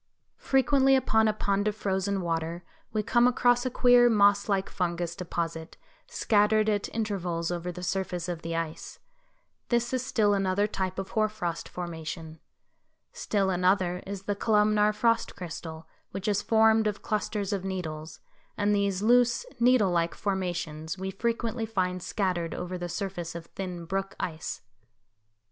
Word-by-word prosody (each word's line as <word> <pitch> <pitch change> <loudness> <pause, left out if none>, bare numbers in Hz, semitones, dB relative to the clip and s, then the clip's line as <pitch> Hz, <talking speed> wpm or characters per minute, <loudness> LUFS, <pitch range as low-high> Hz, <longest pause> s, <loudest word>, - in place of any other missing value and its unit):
Frequently 270 0 +3
upon 220 -4 +3
a - - +4
pond 205 -1 0
of 210 - 0
frozen 195 -1 -1
water 165 0 -2 0.3
we 215 -1 -1
come 240 +3 +4
across 245 0 +3
a - - 0
queer 245 -1 +5
moss 205 -2 +4
like 195 -1 +1
fungus 175 -1 -2
deposit 165 -3 -4 0.3
scattered 215 0 +2
at 205 -1 0
intervals 180 -6 -2
over 175 0 -3
the 180 +1 -8
surface 180 -2 -2
of 175 -2 -4
the 165 0 -4
ice. 165 -1 -4 0.7
This 240 0 +1
is 255 -1 0
still 220 -6 +2
another 195 0 +1
type 190 -3 -3
of 195 0 -4
hoar 215 -1 +2
frost 175 -6 -4
formation. 160 -2 -6 0.7
Still 195 -2 0
another 180 0 +1
is 195 -1 -5
the 205 +1 -1
columnar 210 0 +3
frost 230 +2 +1
crystal, 160 -2 -7 0.2
which 195 +2 -5
is 205 -1 +2
formed 220 0 +4
of 210 -2 -3
clusters 210 -1 -2
of 195 -2 -2
needles, 160 -5 -5 0.4
and 205 0 +2
these 200 -1 0
loose, 245 - +4
needle 240 -5 +4
like 170 -1 0
formations 175 -5 -3
we 190 +1 -4
frequently 230 +2 -2
find 185 -4 -1
scattered 180 -4 -1
over 180 +1 -4
the 175 -1 -4
surface 175 -2 -4
of 170 -1 -6
thin 180 -2 -6
brook 195 +3 -3
ice. 160 -2 -4
195 Hz, 155 wpm, -28 LUFS, 175-215 Hz, 0.7 s, queer